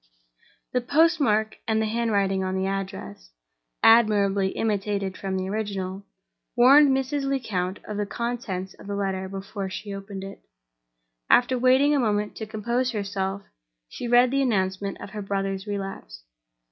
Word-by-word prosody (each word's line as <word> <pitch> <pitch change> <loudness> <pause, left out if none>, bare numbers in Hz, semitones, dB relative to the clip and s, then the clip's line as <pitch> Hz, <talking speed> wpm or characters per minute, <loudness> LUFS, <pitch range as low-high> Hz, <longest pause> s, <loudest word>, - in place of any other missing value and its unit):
The 250 - +2
postmark 280 -6 +2
and 220 0 +2
the 220 - +1
handwriting 205 -4 0
on 185 0 -2
the 190 0 0
address 190 - -5 0.5
(admirably 205 -4 +5
imitated 200 -2 -1
from 190 -1 -3
the 185 0 -2
original) 195 -2 -4 0.5
warned 275 +4 +7
Mrs. 270 +1 0
Lecount 210 -9 -2
of 210 - -5
the 205 -1 -1
contents 215 -6 -4
of - - -14
the 200 - -3
letter 190 -1 -2
before 195 0 -5
she 200 +2 -6
opened 195 0 -7
it. 195 0 -9 0.9
After 250 +1 +5
waiting 260 +4 +4
a 290 - +3
moment 210 -3 0
to 220 - -5
compose 235 +4 -1
herself, 195 -1 -3 0.5
she 245 - -6
read 245 +1 +5
the 275 0 +2
announcement 195 -5 -1
of - - -9
her 210 - -5
brother's 195 0 -3
relapse. 195 - -6
205 Hz, 145 wpm, -25 LUFS, 195-235 Hz, 0.9 s, warned